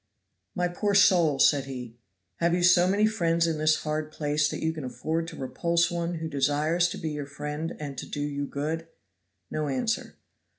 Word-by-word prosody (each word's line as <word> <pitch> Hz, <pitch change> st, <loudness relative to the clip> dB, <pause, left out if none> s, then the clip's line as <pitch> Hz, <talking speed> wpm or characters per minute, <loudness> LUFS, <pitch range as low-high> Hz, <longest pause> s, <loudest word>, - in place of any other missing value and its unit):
"My 180 Hz, -2 st, +1 dB
poor 200 Hz, +3 st, -1 dB
soul," 170 Hz, -7 st, +5 dB
said 140 Hz, 0 st, +4 dB
he, 125 Hz, -4 st, -7 dB, 0.4 s
"have 170 Hz, +1 st, +2 dB
you 180 Hz, -, 0 dB
so 180 Hz, 0 st, +6 dB
many 200 Hz, +3 st, +3 dB
friends 170 Hz, -6 st, +1 dB
in 160 Hz, -2 st, -1 dB
this 155 Hz, 0 st, +2 dB
hard 155 Hz, 0 st, -2 dB
place 150 Hz, 0 st, 0 dB
that -, -, -5 dB
you 160 Hz, 0 st, +1 dB
can 155 Hz, -3 st, -6 dB
afford 155 Hz, +7 st, -2 dB
to 165 Hz, -, -8 dB
repulse 170 Hz, +5 st, 0 dB
one 170 Hz, 0 st, -2 dB
who 160 Hz, 0 st, -4 dB
desires 150 Hz, +4 st, +1 dB
to -, -, -5 dB
be 160 Hz, -, -3 dB
your 145 Hz, -2 st, -5 dB
friend 150 Hz, +3 st, -5 dB
and 145 Hz, -2 st, -5 dB
to -, -, -7 dB
do 145 Hz, -, -4 dB
you 145 Hz, -1 st, -2 dB
good?" 160 Hz, +4 st, -3 dB, 0.6 s
No 155 Hz, -1 st, -1 dB
answer. 140 Hz, -, -2 dB
155 Hz, 195 wpm, -27 LUFS, 145-170 Hz, 0.6 s, so